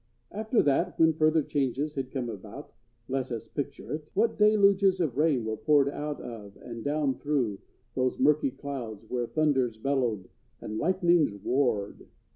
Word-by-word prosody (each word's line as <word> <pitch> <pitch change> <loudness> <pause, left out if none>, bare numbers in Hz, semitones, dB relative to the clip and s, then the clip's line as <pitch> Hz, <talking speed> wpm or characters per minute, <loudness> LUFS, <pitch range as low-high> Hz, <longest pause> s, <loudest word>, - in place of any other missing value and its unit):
After 220 +3 +1
that, 145 +5 +1
when 160 0 +5
further 155 0 +3
changes 140 +1 -1
had 135 -3 -4
come 130 -3 -3
about,—let 120 +4 -7
us 115 -1 -5
picture 145 +4 -5
it,—what 190 +9 -1
deluges 200 -2 +4
of 155 -9 0
rain 145 -5 +2
were 110 0 -2
poured 145 +2 +3
out 150 +1 -4
of 105 -4 -9
and 115 -2 -8
down 145 -1 0
through 130 -9 -1 0.3
those 130 0 0
murky 145 +1 +3
clouds 130 -6 -7
where 120 -1 -1
thunders 135 -7 +1
bellowed 120 -6 -1 0.3
and 110 +1 -5
lightnings 175 - +2
warred! 110 -1 -1
135 Hz, 145 wpm, -28 LUFS, 120-155 Hz, 0.3 s, when